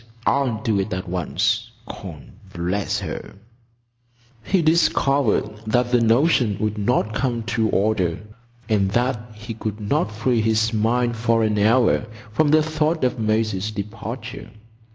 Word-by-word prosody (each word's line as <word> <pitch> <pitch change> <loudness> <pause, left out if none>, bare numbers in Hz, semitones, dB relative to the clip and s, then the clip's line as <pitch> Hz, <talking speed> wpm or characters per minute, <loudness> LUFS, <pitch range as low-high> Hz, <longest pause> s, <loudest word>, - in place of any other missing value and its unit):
I'll 130 -6 +1
do 105 -3 +1
it 95 +2 -2
at 90 - -5
once, 90 -2 -1 0.2
con—bless 90 +4 -5
her." - - -6 1.1
He 190 -4 +1
discovered 145 -6 +2 0.2
that 120 +2 +1
the 125 -1 +4
notion 115 - +3
would 105 0 -1
not 110 0 +1
come 120 -1 -1
to 110 -1 0
order, 95 -5 +1 0.5
and 100 -4 +2
that 120 -1 +1
he 110 +2 -7
could 110 -1 -5
not 105 -1 0
free 115 +2 0
his 110 +1 +1
mind 120 +2 +1
for 115 0 +1
an 105 -1 +1
hour 115 +1 +3 0.2
from 155 +8 +2
the 155 +1 +5
thought 155 0 0
of 125 -1 0
Maisie's 110 -2 0
departure. 110 +5 -6
110 Hz, 135 wpm, -22 LUFS, 105-125 Hz, 1.1 s, the